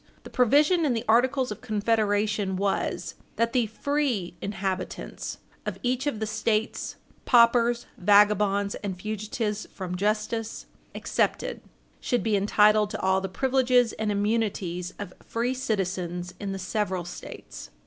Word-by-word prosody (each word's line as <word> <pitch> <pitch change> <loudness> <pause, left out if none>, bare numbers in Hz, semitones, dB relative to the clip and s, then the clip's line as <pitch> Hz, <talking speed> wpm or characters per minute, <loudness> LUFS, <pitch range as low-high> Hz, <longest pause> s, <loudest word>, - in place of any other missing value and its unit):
The - - -11
provision 295 +8 +4
in 285 -5 +2
the 225 +1 -3
Articles 250 +2 +3
of 210 - -6
Confederation 210 -2 +1
was 195 +1 -1 0.2
"that 230 0 +1
the 245 -4 +2
free 250 -5 -1
inhabitants 190 -2 -4 0.3
of - - -4
each 255 +3 0
of 230 -7 -1
the 220 - -1
States, 215 +1 -1 0.3
paupers, 235 0 +4
vagabonds, 205 0 +4
and 190 -3 -5
fugitives 215 +1 -3
from 185 -2 -5
justice, 215 +3 -1 0.3
excepted, - - -1 0.4
should 245 - 0
be 220 -2 +2
entitled 210 +1 +4
to - - -5
all 190 0 +2
the 195 - -3
privileges 255 +1 +2
and 215 -1 -2
immunities 200 -4 -1
of 195 -3 -7
free 240 +2 -1
citizens 185 -7 -2
in 200 -1 -3
the 195 - -3
several 190 -2 -2
States." 60 - -9
210 Hz, 135 wpm, -26 LUFS, 195-235 Hz, 0.4 s, provision